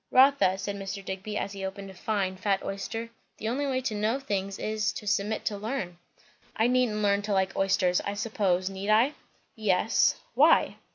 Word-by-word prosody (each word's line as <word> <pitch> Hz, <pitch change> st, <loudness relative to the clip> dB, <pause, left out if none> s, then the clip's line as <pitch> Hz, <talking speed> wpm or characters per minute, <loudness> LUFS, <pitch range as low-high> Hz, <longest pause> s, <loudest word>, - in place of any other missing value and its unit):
"Rotha," 260 Hz, -7 st, +5 dB
said 200 Hz, +1 st, -4 dB
Mr. 195 Hz, 0 st, -6 dB
Digby, 195 Hz, +3 st, -4 dB
as 200 Hz, -, -2 dB
he 195 Hz, -1 st, -7 dB
opened 195 Hz, 0 st, -5 dB
a -, -, -12 dB
fine, 190 Hz, 0 st, -1 dB
fat 195 Hz, +1 st, 0 dB
oyster, 225 Hz, +4 st, -4 dB, 0.3 s
"the 220 Hz, -, -4 dB
only 275 Hz, +5 st, -1 dB
way 260 Hz, -1 st, 0 dB
to 235 Hz, -, -2 dB
know 215 Hz, +5 st, 0 dB
things 200 Hz, -7 st, -3 dB
is, 215 Hz, 0 st, -1 dB
to 215 Hz, -, -7 dB
submit 210 Hz, +1 st, 0 dB
to 205 Hz, -2 st, -1 dB
learn." 210 Hz, -6 st, -4 dB, 0.6 s
"I 220 Hz, -, +2 dB
needn't 245 Hz, -4 st, +2 dB
learn 200 Hz, 0 st, +3 dB
to 205 Hz, 0 st, -2 dB
like 190 Hz, 0 st, +1 dB
oysters, 190 Hz, -2 st, +2 dB
I 200 Hz, -, -4 dB
suppose, 200 Hz, -4 st, 0 dB
need 195 Hz, +1 st, -4 dB
I?" 230 Hz, +7 st, +4 dB, 0.4 s
"Yes." 210 Hz, -2 st, +2 dB, 0.2 s
"Why?" -, -, +4 dB
205 Hz, 185 wpm, -28 LUFS, 195-220 Hz, 0.6 s, Rotha